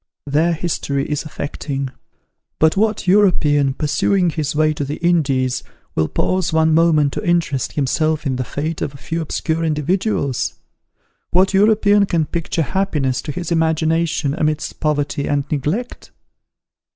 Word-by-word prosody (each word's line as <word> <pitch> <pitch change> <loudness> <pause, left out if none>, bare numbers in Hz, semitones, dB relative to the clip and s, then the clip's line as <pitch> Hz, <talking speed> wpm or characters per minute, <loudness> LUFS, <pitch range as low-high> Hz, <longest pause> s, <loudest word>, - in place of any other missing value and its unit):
Their 155 +4 +2
history 150 -4 -2
is 150 +1 -3
affecting; 140 -2 -4 0.7
but 160 0 +3
what 215 +1 +1
European, 150 -8 +3
pursuing 170 +5 +1
his 150 -2 -2
way 155 0 +3
to 145 - -3
the 140 +2 -3
Indies, 140 -8 +1 0.3
will 80 - +1
pause 185 - 0
one 160 0 +3
moment 155 -3 +3
to - - -4
interest 170 - 0
himself 155 +3 0
in 130 -2 -1
the 130 - -1
fate 155 +6 -4
of 140 - -3
a - - -9
few 165 +4 -4
obscure 160 +1 -2
individuals? 155 - -1 0.7
What 190 +3 +3
European 205 0 +4
can 165 -4 +1
picture 165 0 -2
happiness 150 -8 -1
to 150 - -5
his 175 +3 -5
imagination 160 -2 +1
amidst 155 -1 -2
poverty 145 -1 -1
and 145 -1 +1
neglect? 155 - -3
155 Hz, 140 wpm, -19 LUFS, 145-175 Hz, 0.7 s, European